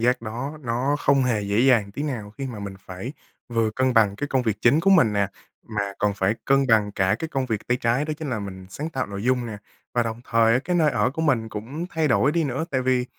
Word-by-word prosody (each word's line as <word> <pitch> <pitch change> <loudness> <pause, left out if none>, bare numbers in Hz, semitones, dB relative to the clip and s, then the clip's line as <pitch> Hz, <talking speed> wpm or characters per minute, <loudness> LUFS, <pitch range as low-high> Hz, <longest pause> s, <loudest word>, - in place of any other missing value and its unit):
giác 125 +1 +2
đó 125 +7 -5
nó 125 +3 0
không 140 -2 +3
hề 115 -4 +1
dễ 100 +3 +1
dàng 120 -6 +4
tí 145 - -4
nào 120 -9 -4
khi 135 +5 -6
mà 120 -5 -6
mình 100 -1 -6
phải 95 +9 -6 0.4
vừa 115 -2 +1
cân 130 +3 0
bằng 105 -3 +4
cái 145 - -3
công 130 -2 +1
việc 110 -3 0
chính 140 +7 +4
của 195 - +3
mình 160 - +5
nè, 100 -1 +2 0.4
mà 100 -2 -2
còn 105 -1 +1
phải 100 +1 +1
cân 135 0 +3
bằng 105 -3 +3
cả 95 0 +2
cái 160 - -4
công 135 -3 -2
việc 110 -4 -3
tay 125 - +2
trái 120 +5 +1
đó 155 - -2
chính 150 -4 -4
là 115 - -1
mình 95 -2 -7
sáng 150 +11 -5
tạo 135 -4 -2
nội 100 0 -6
dung 125 0 +1
nè. 110 -3 -6 0.4
Và 120 - +3
đồng 115 0 -4
thời 115 -1 +3
á, 125 - +4
cái 180 - 0
nơi 155 -3 +4
ở 115 -2 +1
của 160 +4 -3
mình 125 -8 +1
cũng 130 +12 -5
thay 160 -2 0
đổi 135 +2 +3
đi 170 0 +1
nữa, 140 +3 -2
tại 130 -2 0
vì 125 -1 +2
120 Hz, 270 wpm, -24 LUFS, 105-135 Hz, 0.4 s, mình